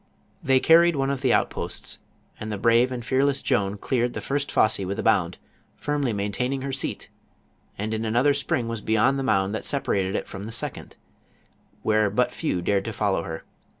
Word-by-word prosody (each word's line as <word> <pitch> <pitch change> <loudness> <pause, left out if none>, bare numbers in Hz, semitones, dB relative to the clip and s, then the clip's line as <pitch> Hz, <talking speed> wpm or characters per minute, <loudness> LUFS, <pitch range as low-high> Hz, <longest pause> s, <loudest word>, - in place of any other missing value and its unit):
They 130 -1 +3
carried 170 +3 +5
one 135 0 0
of 135 -1 -3
the 130 -3 +2
outposts, - - -1 0.4
and 110 0 -5
the 105 - -2
brave 115 +4 +3
and 120 -2 -5
fearless 135 +1 +1
Joan 105 -6 0
cleared 120 +3 -1
the - - -4
first 140 +1 -2
fosse 110 - +3
with 95 +1 -3
a - - -3
bound, - - +2 0.4
firmly 145 -4 -1
maintaining 125 +6 -2
her 140 - -3
seat, 135 - -4 0.7
and 110 +2 -3
in 110 0 -2
another 120 +6 +3
spring 135 -4 -1
was 115 -2 -4
beyond 110 +6 +2
the - - -1
mound 95 -5 +1
that 110 - -3
separated 100 -9 -1
it - - -3
from 95 +1 -7
the 110 - -6
second, 115 - -3 0.9
where 110 -1 +3
but 125 +5 +1
few 90 - -2
dared 100 +1 +1
to 115 - -4
follow 100 -2 0
her. 80 -1 -6
115 Hz, 190 wpm, -25 LUFS, 105-135 Hz, 0.9 s, carried